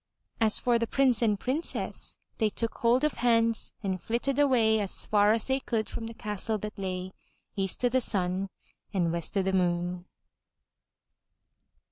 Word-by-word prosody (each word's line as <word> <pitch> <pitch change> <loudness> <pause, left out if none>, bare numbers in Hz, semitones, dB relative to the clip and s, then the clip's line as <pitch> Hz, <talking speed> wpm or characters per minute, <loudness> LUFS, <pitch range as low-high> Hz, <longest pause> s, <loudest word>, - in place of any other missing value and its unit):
As 220 -2 +5
for 240 -1 +2
the 230 - -1
Prince 260 -1 +2
and 210 -4 +2
Princess, 290 +7 -3 0.2
they 220 -2 +3
took 230 +2 0
hold 240 +4 +3
of 300 - 0
hands 230 -1 +2
and 190 -2 -2
flitted 250 +4 -1
away 235 -6 +4
as 200 -2 -2
far 205 0 +4
as 225 0 +2
they 265 0 +1
could 225 -5 -2
from 225 - -6
the 230 - -9
castle 210 0 -2
that 210 0 -6
lay 185 -1 -4 0.4
EAST 195 +4 0
O' - - +4
THE 260 +1 +2
SUN 190 -2 0 0.5
AND 170 -3 +1
WEST 170 +3 -2
O' 195 - +2
THE 190 0 -1
MOON. 175 -1 0
220 Hz, 165 wpm, -28 LUFS, 190-235 Hz, 0.5 s, As